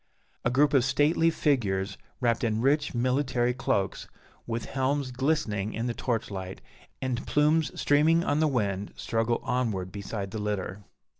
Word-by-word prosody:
A - - +2
group 145 +4 +3
of 135 -3 +5
stately 150 +5 +3
figures, 105 -12 0 0.2
wrapped 120 -3 +1
in 110 -2 +1
rich 140 +3 +1
military 125 0 +1
cloaks, 100 -7 -1 0.4
with 115 0 -3
helms 135 0 -1
glistening 125 -7 -1
in 115 - -2
the 120 - -1
torch 115 -2 -2
light, 95 -1 -6 0.4
and 125 -2 -1
plumes 150 +2 +2
streaming 160 +4 +4
on 145 -2 +1
the 155 - +3
wind, 100 -7 -1
struggle 115 +1 -1
onward 105 -8 -1
beside 100 -1 -5
the 110 - -4
litter. 100 -1 -3
120 Hz, 150 wpm, -28 LUFS, 105-145 Hz, 0.4 s, of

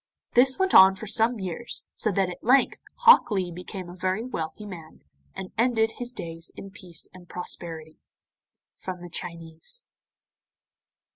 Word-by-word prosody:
This 260 +2 +5
went 380 0 +1
on 190 0 +9
for 215 - -7
some 225 +2 +2
years, 190 +5 -4
so 215 - -1
that 195 0 +1
at 180 - -8
length 260 +4 +4 0.2
Hok 475 - +8
Lee 190 -4 -1
became 180 +1 -7
a 175 - -9
very 185 +4 -1
wealthy 165 -4 -5
man, 170 -6 -10 0.3
and 185 - -6
ended 225 -2 +3
his 245 0 -3
days 165 -7 -7
in 195 - -9
peace 185 -5 -8
and 180 -1 -15
prosperity. 165 -3 -4 0.8
From 180 -2 -7
the 175 - -9
Chinese. 165 - -5
190 Hz, 150 wpm, -26 LUFS, 175-230 Hz, 0.8 s, on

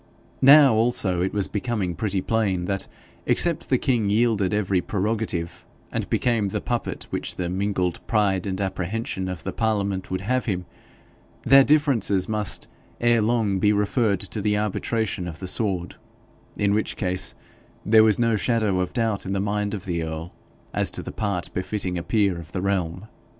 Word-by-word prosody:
Now, 140 -1 +8
also, 110 -6 +2
it 95 - 0
was 100 -2 0
becoming 105 -4 -2
pretty 100 +1 -1
plain 100 -6 0
that 100 +1 -2 0.4
except 170 -3 0
the 130 - +4
king 120 -6 +1
yielded 105 -3 +2
every 100 -3 +1
prerogative, 100 -5 -2 0.3
and - - -3
became 115 -4 +1
the 95 - -2
puppet - - -3
which - - -2
the 90 -1 -3
mingled 95 -2 -1
pride 100 -4 +1
and 95 0 -3
apprehension 95 +1 -3
of 90 -2 -6
the - - -4
Parliament 100 -4 -1
would 95 0 -2
have 130 +6 0
him, 90 -5 -2 0.8
their 135 +2 +7
differences 130 -11 +2
must 105 -2 -1 0.3
ere 120 -1 +3
long 105 -3 +1
be 105 +2 +4
referred 105 -1 +1
to 110 - -3
the 105 0 +1
arbitration 105 -2 -1
of 80 -3 -6
the 95 - -6
sword, 90 -3 -2 0.6
in 100 -1 +2
which 105 +1 0
case 90 -1 -1 0.5
there 110 +1 +6
was 110 -2 +4
no 115 -2 +2
shadow 110 -3 +1
of 90 - -2
doubt 115 -4 0
in 95 - -2
the 100 - 0
mind 105 +1 -1
of 95 - -8
the 85 -2 -2
earl 80 +2 -5 0.4
as - - +1
to - - -5
the - - -6
part 100 -5 -2
befitting 95 -1 -3
a - - -4
peer 100 -3 +1
of 80 0 -11
the 95 - -2
realm. 90 -1 -1
100 Hz, 175 wpm, -24 LUFS, 95-110 Hz, 0.8 s, Now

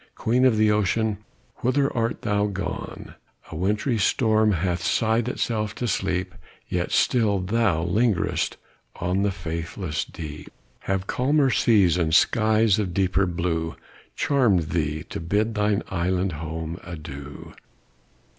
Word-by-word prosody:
Queen 125 +3 +2
of 120 -4 +4
the 110 0 +4
ocean! 105 0 +1 0.4
whither 135 +3 +1
art 115 -1 -1
thou 105 0 +1
gone? 95 -4 -5 0.4
The - - -6
wintry 105 - 0
storm 110 +1 +3
hath 85 0 -1
sighed 110 +5 +1
itself 110 -4 -2
to 120 - -2
sleep, 90 -4 -1 0.3
Yet 90 0 -2
still 110 -5 +2
thou 95 -3 +1
lingerest 100 +1 0 0.4
on 90 +3 -1
the 100 - +2
faithless 85 -2 -4
deep; 75 -2 -8 0.4
Have 95 -1 0
calmer 135 +4 +2
seas, 100 -9 +4
and 80 -2 +1
skies 110 0 +3
of 90 -4 -2
deeper 95 0 +2
blue, 85 -2 -2 0.4
Charm'd 105 - +2
thee 80 -2 -1
to - - -7
bid 105 +7 0
thine 105 -1 +1
island 90 +1 0
home 80 +2 -5
adieu! 75 -5 -9
95 Hz, 130 wpm, -24 LUFS, 85-110 Hz, 0.4 s, of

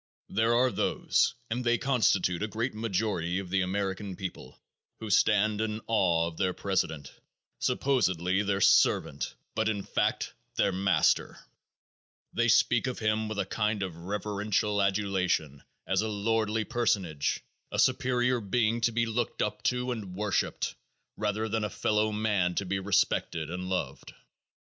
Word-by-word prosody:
There 115 +1 +2
are 125 +1 +3
those, - - +1 0.2
and 125 +2 -1
they 120 0 +3
constitute 100 -10 +2
a 105 - 0
great 115 +5 -2
majority 100 -5 -1
of 95 -2 -5
the 95 0 +2
American 95 +1 -2
people, 95 0 -7 0.4
who 110 -2 -5
stand 105 +1 +3
in 110 -1 -2
awe 90 -7 +2
of 85 -1 -6
their 95 -2 +1
president, 80 -8 -2 0.5
supposedly 95 -8 +1
their 100 -1 -1
servant, - - +3 0.2
but 110 0 +1
in 100 -2 -2
fact - - -1 0.2
their - - +2
master; 95 +1 +2 1.0
they 120 0 +2
speak 120 +2 +3
of 125 - -3
him 110 0 0
with 110 - -4
a 100 - 0
kind 105 0 -1
of 90 -4 -5
reverential 105 +3 -1
adulation 95 -7 0 0.2
as 95 +1 +1
a 110 - -1
lordly 110 +1 0
personage, 100 - 0 0.3
a - - -3
superior 125 0 +2
being 115 +3 +1
to 115 - +2
be 115 +1 +1
looked 115 +1 -1
up 105 0 -3
to 125 0 0
and 100 -6 -5
worshiped 105 0 -1 0.4
rather 105 +1 -1
than 110 0 -1
a 105 - -1
fellowman 105 -3 0
to 100 - -1
be 95 +1 -1
respected 95 -4 0
and 90 +1 -4
loved. 95 - -4
105 Hz, 150 wpm, -29 LUFS, 95-110 Hz, 1.0 s, are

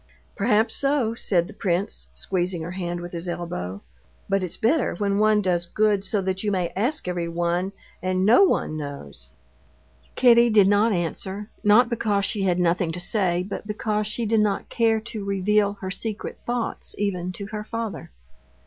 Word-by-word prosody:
"Perhaps 220 +1 +2
so," 275 -5 +1
said 180 -6 +1
the 215 - -11
prince, 185 0 -2
squeezing 180 -2 -2
her 170 - -5
hand 175 -1 -4
with 175 0 -7
his 170 +1 -5
elbow; 100 - -5 0.4
"but 195 0 +1
it's 180 -2 -4
better 270 - +1
when 200 +1 0
one 215 -1 +4
does 175 -2 0
good 210 -1 +1
so 205 0 -1
that 190 +1 -2
you 210 - 0
may 180 -3 0
ask 240 +5 -1
everyone 175 +1 -1 0.3
and 185 +1 0
no 230 - +6
one 350 - +1
knows." 105 - -8 0.9
Kitty 240 -1 +6
did 210 -3 +5
not 205 +3 +4
answer, 190 +3 -3
not 215 +4 +6
because 210 -4 0
she 210 -1 -1
had 180 -2 +1
nothing 175 -1 +1
to 175 - -5
say, 180 -2 +1
but 205 - -6
because 210 0 -1
she 225 +2 -2
did 220 +1 +2
not 205 -2 0
care 225 -1 +2
to 220 -2 -6
reveal 200 +1 +1
her 190 -1 -4
secret 215 +2 -4
thoughts 240 -1 -3
even 185 -3 -1
to 200 - -6
her 210 0 -3
father. 230 -1 -5
200 Hz, 175 wpm, -24 LUFS, 175-215 Hz, 0.9 s, no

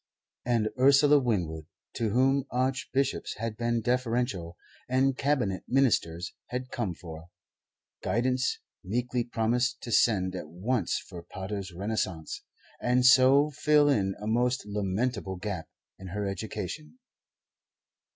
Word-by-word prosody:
And 115 -3 +1
Ursula 140 +2 +6
Winwood, 85 - -2 0.3
to 115 - 0
whom 135 +4 +2
Archbishops 130 +2 -1
had 115 -1 -3
been 120 0 0
deferential 120 -7 -1 0.3
and 130 +1 +2
Cabinet 130 -9 0
Ministers 95 -10 +1
had 125 +1 -5
come 105 -8 -2
for, 80 0 -10 0.7
guidance, 125 +2 0 0.3
meekly 120 +4 -1
promised 120 +3 0
to 120 - -6
send 95 -5 +3
at 90 - -6
once 105 +9 -1
for 90 -3 -9
Pater's 95 +2 -6
'Renaissance' 95 -3 -3 0.4
and 125 +1 +2
so 130 +3 +6
fill 150 0 +4
in 95 -8 +1
a 105 - -7
most 120 +2 +1
lamentable 100 0 -2
gap 95 -3 -5 0.3
in 95 - -8
her 100 +3 -3
education. 110 - -5
115 Hz, 120 wpm, -28 LUFS, 95-130 Hz, 0.7 s, Ursula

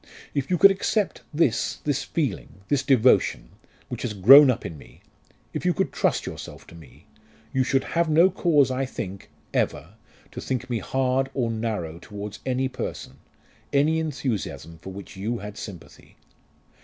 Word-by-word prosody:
If 140 -2 -2
you 180 - +2
could 195 +3 +8
accept 200 +1 -1
this 145 -7 +1
this 145 -2 0
feeling 130 - -3
this 145 -2 +2
devotion 130 -3 +3 0.4
which - - -6
has 110 -4 -3
grown 135 +9 +9
up 125 -1 -1
in 80 - -5
me 70 - -16 0.5
if - - -4
you - - +1
could - - 0
trust - - 0
yourself - - -8
to - - -14
me 80 -7 -16 0.5
you 130 - +2
should 135 +1 +1
have 170 -1 0
no 165 +5 +5
cause, 150 -7 +3
I 130 +1 -1
think 100 -7 -6 0.2
ever 75 +7 -1 0.4
to - - -7
think 130 -1 -3
me 115 - 0
hard 130 +4 0
or 120 -4 0
narrow 105 -8 -3
towards 100 +3 -8
any 130 +1 +1
person, 95 - -6 0.5
any 150 +3 +3
enthusiasm 120 - -4
for 95 - -9
which 100 0 -10
you 110 +5 -3
had 105 -2 -8
sympathy. 100 -6 -11
125 Hz, 165 wpm, -25 LUFS, 100-145 Hz, 0.5 s, grown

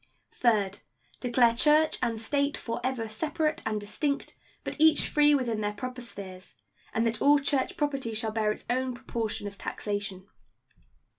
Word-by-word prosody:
Third. 205 -5 +1 0.4
Declare 240 -2 +4
church 305 +5 +4
and 230 -1 0
state 280 +5 0
forever 240 0 -3
separate 305 +7 -1
and 215 -1 0
distinct, 245 +8 -2 0.3
but - - -5
each 315 -1 +5
free 295 -1 +5
within 235 -5 -1
their 210 0 -1
proper 255 +4 -6
spheres; 190 -5 -9 0.4
and 225 - +1
that 230 -1 -1
all 290 +1 +6
church 275 -1 0
property 275 -6 -1
shall 220 0 +1
bear 215 -1 +1
its - - -6
own 255 +1 0
proportion 225 -3 -3
of 200 0 -7
taxation. 200 -2 -4
235 Hz, 150 wpm, -28 LUFS, 215-280 Hz, 0.4 s, all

